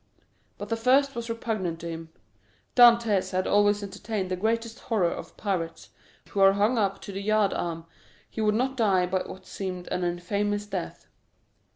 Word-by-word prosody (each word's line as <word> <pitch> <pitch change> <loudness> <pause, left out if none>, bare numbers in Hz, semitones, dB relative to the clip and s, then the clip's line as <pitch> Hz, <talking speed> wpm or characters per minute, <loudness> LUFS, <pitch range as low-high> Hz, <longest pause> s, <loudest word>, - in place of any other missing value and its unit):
But - - -7
the 230 - +1
first 270 +4 +3
was 235 -2 -5
repugnant 215 -7 -2
to 170 - -5
him. 165 -1 -6 0.7
Dantès 235 -6 +5
had 185 0 0
always 205 0 +3
entertained 200 -1 -4
the - - +1
greatest 225 +4 -1
horror 195 -7 0
of - - -8
pirates, 180 -5 -3 0.4
who 200 - -3
are 195 0 +7
hung 210 +4 +2
up 195 -2 0
to - - -7
the 195 0 -5
yard 215 -1 +2
arm; 165 -1 -3 0.4
he 220 - -5
would 210 -1 +2
not 260 +3 0
die 195 -7 +3
by 185 +1 0
what 185 0 -9
seemed 185 -2 -5
an 180 - -1
infamous 200 +4 -1
death. 190 -4 -5
205 Hz, 175 wpm, -27 LUFS, 185-225 Hz, 0.7 s, are